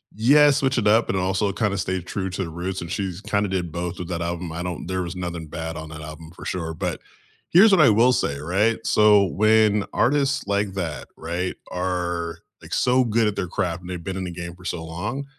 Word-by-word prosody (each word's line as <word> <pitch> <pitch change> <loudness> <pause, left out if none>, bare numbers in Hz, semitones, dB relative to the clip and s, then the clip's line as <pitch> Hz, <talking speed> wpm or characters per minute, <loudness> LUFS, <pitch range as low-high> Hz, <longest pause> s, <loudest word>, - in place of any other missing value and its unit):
yeah, 145 +7 +6
switch 135 -2 +2
it 105 - 0
up, 110 +2 +5
but - - -2
also 95 +2 0
kinda 100 0 -1
stay 95 0 -2
true 95 +2 -4
to 95 - -3
their 85 - -3
roots, 90 +3 -4
and 85 +1 -6
she's 95 -2 -3
kinda 100 -1 0
did 90 -3 -2
both 85 +1 -4
with 90 - -5
that 85 -1 -3
album. 85 0 -4
I 85 +2 -4
don't 90 -2 -5
there 95 -1 -1
was 85 +1 -6
nothing 85 -2 -4
bad 80 +1 -5
on 80 0 -7
that 75 -1 -8
album 75 +1 -9
for - - -12
sure, 80 -3 -3
but - - -3 0.5
here's 200 +6 +7
what 190 -5 +6
I 140 - +7
will 115 +4 +5
say, 70 - -1
right? 100 +9 +1
So, 105 -1 +5
when 105 +1 +3
artists 135 -2 +1
like 100 -1 0
that, 80 -8 -4
right? 85 +3 -3 0.2
Are, 90 -2 -2 0.2
like, - - -8
so 125 +1 +3
good 115 -1 +2
at 105 - -1
their 90 - -2
craft 90 0 -2
and 90 - -10
they've 90 -2 -5
been 95 0 -4
in 95 - -3
the 90 - -5
game 85 0 -7
for 90 - -16
so 80 -1 -3
long, 105 +12 -4
90 Hz, 235 wpm, -23 LUFS, 85-105 Hz, 0.5 s, here's